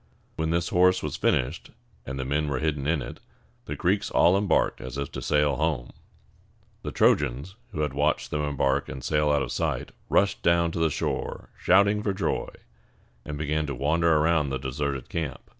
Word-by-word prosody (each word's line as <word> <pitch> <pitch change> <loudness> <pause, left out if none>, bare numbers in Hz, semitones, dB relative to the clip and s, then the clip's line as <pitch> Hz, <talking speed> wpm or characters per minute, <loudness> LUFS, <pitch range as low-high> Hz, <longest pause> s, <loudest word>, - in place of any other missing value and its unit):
When 80 0 -1
this 85 +1 0
horse 90 +1 +3
was - - -3
finished, 65 +7 0 0.4
and 65 +1 -4
the 65 - -3
men 75 +3 0
were 70 -2 -1
hidden 75 0 -1
in 80 -3 +1
it, - - -8 0.5
the - - -4
Greeks - - 0
all 90 - +4
embarked 100 0 +1
as 65 +1 -6
if 70 - -4
to - - -6
sail 75 -2 +2
home. 75 -6 -1 0.9
The - - -5
Trojans, 70 +5 +2 0.2
who 80 - -3
had 75 -3 -1
watched 75 +2 0
them 75 - -1
embark 70 -1 0
and 65 - -7
sail 75 -1 +2
out 70 -2 +2
of - - -5
sight, - - -2 0.2
rushed 100 +1 +2
down 85 0 +3
to 85 - -4
the 80 -1 +3
shore - - -3
shouting 100 +3 +3
for 105 -2 -1
joy, 95 - -1 0.8
and 75 - -5
began 75 +1 -1
to 70 - -3
wander 80 +6 +2
around 80 -1 +2
the 65 - -1
deserted 65 0 -3
camp. 80 -5 -3
75 Hz, 190 wpm, -26 LUFS, 70-85 Hz, 0.9 s, all